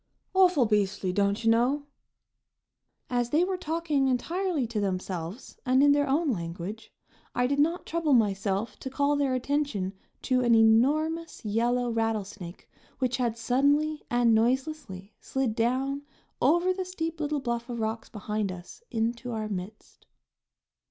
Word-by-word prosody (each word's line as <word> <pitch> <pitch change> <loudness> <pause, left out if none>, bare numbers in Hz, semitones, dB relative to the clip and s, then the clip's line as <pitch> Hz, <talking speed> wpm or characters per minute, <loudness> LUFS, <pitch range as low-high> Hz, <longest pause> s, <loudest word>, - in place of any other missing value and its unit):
"Awful 365 -9 +5
beastly, 200 -3 0
don't 200 +3 +1
you 225 - +4
know!" 250 +6 +2 1.2
As 245 -1 0
they 310 +6 +3
were 375 +1 0
talking 320 -5 0
entirely 330 +4 0
to 225 -2 -3
themselves 185 +1 -4
and 260 +1 +4
in 290 - +6
their 285 -1 +2
own 295 +2 +2
language, 180 +3 -5 0.4
I 245 - +2
did 280 +3 0
not 330 +5 +1
trouble 330 -3 0
myself 200 -1 +1
to 265 - -5
call 285 +2 +1
their 275 -3 +1
attention 255 -8 -1 0.3
to 255 -1 +2
an 240 -2 +4
enormous 290 +8 +2
yellow 240 +3 +1
rattlesnake 210 -5 -3 0.3
which 250 -2 0
had 235 -3 -1
suddenly 285 +6 +2
and 240 -1 +3
noiselessly 235 -4 -1
slid 265 -4 -1
down, 260 +5 0 0.4
over 345 +7 +3
the 375 0 -3
steep 330 -3 -4
little 300 -1 -1
bluff 235 -2 -3
of 240 -1 -4
rocks 220 +1 -3
behind 210 -2 -3
us, 180 - -10
into 235 +2 -2
our 220 -2 -3
midst. 200 +1 -8
245 Hz, 145 wpm, -28 LUFS, 220-290 Hz, 1.2 s, in